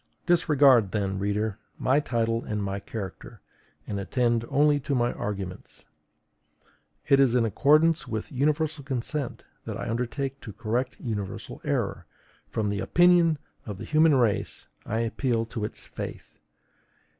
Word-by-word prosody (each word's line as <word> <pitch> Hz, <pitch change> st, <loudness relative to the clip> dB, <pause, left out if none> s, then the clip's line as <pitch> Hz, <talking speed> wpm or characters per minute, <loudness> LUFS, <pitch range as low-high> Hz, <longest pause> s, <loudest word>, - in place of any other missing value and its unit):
Disregard 140 Hz, -, +4 dB
then, 100 Hz, -2 st, -1 dB
reader, 105 Hz, +1 st, -1 dB, 0.2 s
my 135 Hz, +3 st, +3 dB
title 115 Hz, -4 st, 0 dB
and 105 Hz, -1 st, -3 dB
my 100 Hz, 0 st, -2 dB
character, 100 Hz, -2 st, -7 dB, 0.5 s
and 100 Hz, -, -3 dB
attend 120 Hz, +3 st, +1 dB
only 145 Hz, +1 st, +4 dB
to 140 Hz, 0 st, -2 dB
my 120 Hz, -1 st, +1 dB
arguments. 95 Hz, -3 st, -6 dB, 1.2 s
It 140 Hz, -, +5 dB
is 130 Hz, -3 st, +4 dB
in 120 Hz, -2 st, +3 dB
accordance 155 Hz, +8 st, +3 dB
with 110 Hz, -1 st, -4 dB
universal 150 Hz, +2 st, 0 dB
consent 135 Hz, +1 st, -3 dB, 0.2 s
that -, -, -4 dB
I -, -, -5 dB
undertake 130 Hz, +4 st, -3 dB
to 105 Hz, -, -8 dB
correct 120 Hz, +4 st, -2 dB
universal 105 Hz, -5 st, -5 dB
error; -, -, -2 dB, 0.4 s
from 105 Hz, -2 st, -1 dB
the 100 Hz, -, -2 dB
OPINION 175 Hz, -2 st, +4 dB, 0.3 s
of 105 Hz, -3 st, -5 dB
the -, -, -7 dB
human 155 Hz, -1 st, +4 dB
race 120 Hz, -6 st, 0 dB, 0.2 s
I 110 Hz, +2 st, 0 dB
appeal 115 Hz, 0 st, 0 dB
to 115 Hz, -1 st, -4 dB
its -, -, -4 dB
FAITH. -, -, -8 dB
120 Hz, 140 wpm, -27 LUFS, 105-140 Hz, 1.2 s, It